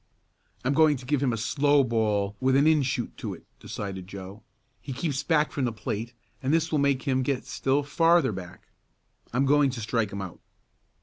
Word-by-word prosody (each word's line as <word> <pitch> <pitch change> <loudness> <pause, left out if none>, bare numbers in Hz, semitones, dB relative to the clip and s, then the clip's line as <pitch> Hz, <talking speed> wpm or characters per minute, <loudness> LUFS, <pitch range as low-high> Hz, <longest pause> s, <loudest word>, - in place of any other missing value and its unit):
"I'm 135 - +2
going 155 -1 +4
to 125 - -11
give 140 +1 0
him 135 -3 +2
a 115 - -2
slow 145 +5 +3
ball 105 -4 0
with 130 0 +2
an 140 +2 +4
in 155 -1 +5
shoot 125 -2 -2
to - - -5
it," - - -18
decided 95 -3 -6
Joe. 95 +2 -9 0.4
"He 135 - -6
keeps 140 0 -2
back 150 -1 +2
from 135 - -1
the 120 - 0
plate 110 +2 -4 0.3
and 135 0 0
this 165 0 +1
will 155 - +2
make 140 -2 +2
him 130 -2 +1
get 130 0 -1
still 135 +2 0
farther 165 -1 +3
back. 90 -3 -9 0.6
I'm 130 +3 +1
going 145 0 +4
to 125 -2 -5
strike 110 -2 -1
him 100 0 -4
out." 95 - -9
130 Hz, 200 wpm, -27 LUFS, 110-145 Hz, 0.6 s, in